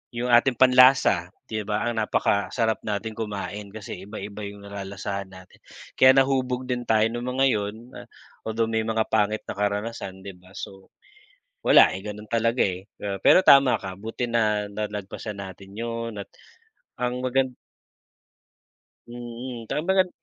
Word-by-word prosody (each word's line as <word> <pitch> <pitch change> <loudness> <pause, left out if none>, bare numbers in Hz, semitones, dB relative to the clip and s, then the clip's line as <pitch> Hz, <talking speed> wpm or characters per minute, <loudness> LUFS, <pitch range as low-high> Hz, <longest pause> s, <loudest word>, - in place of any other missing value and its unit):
'yong 125 +1 -2
ating 120 +1 +4
panlasa, 130 -8 +5 0.2
'di 110 -1 -3
ba. 105 +1 -1
Ang 115 -2 -1
napakasarap 110 +3 0
natin 110 +1 -3
kumain, 105 -1 -5
kasi 100 -3 -8
iba-iba 105 0 -7
'yong 100 0 -9
nalalasahan 100 0 -5
natin. 95 0 -15 0.4
Kaya 130 0 +8
nahubog 130 -1 +1
din 125 -1 -1
tayo 110 -1 +4
no'ng 120 +2 -5
mga 135 - +5
'yon 105 -2 -1 0.2
na, - - -9 0.4
although, 110 0 0
may 110 0 0
mga 110 0 0
pangit 110 0 +1
na - - -4
karanasan, 105 -1 -3
'di 100 - -7
ba. 90 +1 -20
So, 95 -1 -9 0.7
wala, - - +7
eh, 95 - -6
gano'n 105 0 -7
talaga, 115 +1 +1
eh, 95 0 -4 0.2
ah, 100 -1 -3
pero - - +6
tama 140 -2 +7
ka 95 -1 -6
buti 115 +3 -4
na 105 -3 +1
nalagpasan 105 0 -5
natin 95 0 -10
'yon 115 -1 -4
at - - -10 0.7
ang 125 0 -2
magan 130 0 +1 1.6
Mm, 120 0 -8
'tsaka 150 - -1
magan 190 -1 +3
110 Hz, 150 wpm, -25 LUFS, 100-120 Hz, 1.6 s, Kaya